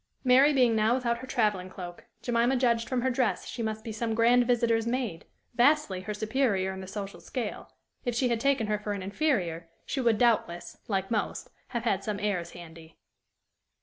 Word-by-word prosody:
Mary 265 +3 +6
being 250 -5 +4
now 220 +2 +3
without 235 -2 -1
her 260 - -8
traveling 210 -8 0
cloak, 175 -2 -9 0.2
Jemima 240 +2 +2
judged 235 -2 +1
from 255 -2 0
her 260 - +2
dress 245 -2 0
she 235 - -6
must 220 -1 -3
be 225 - -5
some 225 +1 -2
grand 240 +1 +4
visitor's 230 -2 +2
maid, 235 -9 -2 0.3
vastly 245 -6 +3
her 210 +3 -4
superior 215 -4 0
in 190 - -7
the 190 - -8
social 200 0 -6
scale: 235 -5 -5 0.3
if 245 -3 -2
she 250 +2 +2
had 235 -1 +1
taken 275 -2 +2
her 210 0 -1
for 210 0 -3
an 200 -2 -5
inferior, 185 - -1 0.2
she 270 - -2
would 230 -3 +3
doubtless, 215 -8 +1
like 195 -1 -1
most, 220 - -2 0.2
have 235 -2 -3
had 200 -4 0
some 210 -1 -3
airs 185 -5 -2
handy. 165 -2 -12
225 Hz, 190 wpm, -28 LUFS, 195-245 Hz, 0.3 s, Mary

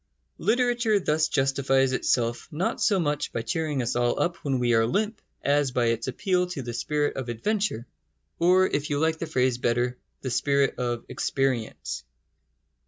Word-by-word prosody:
Literature 240 -3 +2
thus 155 -3 +1
justifies 135 -1 +2
itself 120 -2 0
not 170 +3 -2
so 205 -5 +3
much 150 -3 -1
by 115 - -3
cheering 145 +2 -1
us 120 - -2
all 120 0 +1
up 170 0 0
when 135 -2 -1
we 120 -1 +2
are 115 0 +4
limp 210 - -1 0.2
as 145 -1 +2
by 125 -1 0
its 115 +1 -1
appeal 180 +7 0
to 165 -7 -5
the 120 0 -5
spirit 145 +5 -1
of 130 -2 -4
adventure, 190 - -1 0.5
or, 185 +2 +5
if 145 -4 -1
you 145 - 0
like 160 +1 +1
the 165 - -3
phrase 125 -3 +1
better, 125 +1 0 0.2
the 130 - -3
spirit 140 +2 +1
of 120 -1 -2
experience. 130 -5 -2
135 Hz, 170 wpm, -26 LUFS, 120-165 Hz, 0.5 s, or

